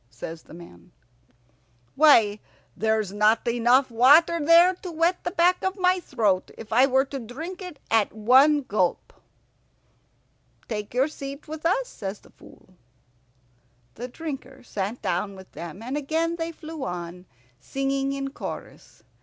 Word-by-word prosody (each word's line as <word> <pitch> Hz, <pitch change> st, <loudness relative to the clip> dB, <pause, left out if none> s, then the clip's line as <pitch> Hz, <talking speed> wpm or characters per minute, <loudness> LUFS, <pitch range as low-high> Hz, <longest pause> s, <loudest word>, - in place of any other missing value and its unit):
says 160 Hz, +6 st, -8 dB
the -, -, -16 dB
man. 90 Hz, -, -14 dB, 1.0 s
"Why, 225 Hz, -9 st, +5 dB, 0.4 s
there's 220 Hz, -2 st, 0 dB
not 215 Hz, +3 st, +2 dB
enough 245 Hz, +3 st, +3 dB
water 295 Hz, +8 st, +5 dB
there 340 Hz, +4 st, +6 dB
to 370 Hz, 0 st, -9 dB
wet 335 Hz, +3 st, 0 dB
the -, -, -1 dB
back 355 Hz, 0 st, +2 dB
of 380 Hz, 0 st, -1 dB
my 365 Hz, 0 st, +2 dB
throat 215 Hz, -, 0 dB
if 220 Hz, -1 st, -8 dB
I 255 Hz, +4 st, +5 dB
were 265 Hz, 0 st, +2 dB
to 275 Hz, 0 st, -6 dB
drink 310 Hz, -, -8 dB
it 360 Hz, -5 st, -8 dB
at 225 Hz, -2 st, +3 dB
one 260 Hz, +7 st, +4 dB
gulp." 190 Hz, -7 st, -1 dB, 1.5 s
"Take 210 Hz, 0 st, -5 dB
your 260 Hz, +3 st, +3 dB
seat 280 Hz, -1 st, -8 dB
with 315 Hz, +1 st, -3 dB
us," -, -, 0 dB
says 195 Hz, -, -6 dB
the -, -, -21 dB
Fool. 185 Hz, -, -19 dB, 1.2 s
The 245 Hz, +2 st, -7 dB
Drinker 270 Hz, -2 st, -8 dB
sat 210 Hz, 0 st, -5 dB
down 195 Hz, +3 st, -2 dB
with 190 Hz, -1 st, -14 dB
them, 170 Hz, +5 st, -9 dB
and 255 Hz, +4 st, -4 dB
again 320 Hz, +4 st, -1 dB
they 330 Hz, 0 st, -3 dB
flew 320 Hz, -2 st, -8 dB
on, 175 Hz, 0 st, -6 dB, 0.3 s
singing 270 Hz, -, -2 dB
in 275 Hz, 0 st, -4 dB
chorus. -, -, -9 dB
265 Hz, 145 wpm, -25 LUFS, 210-315 Hz, 1.5 s, there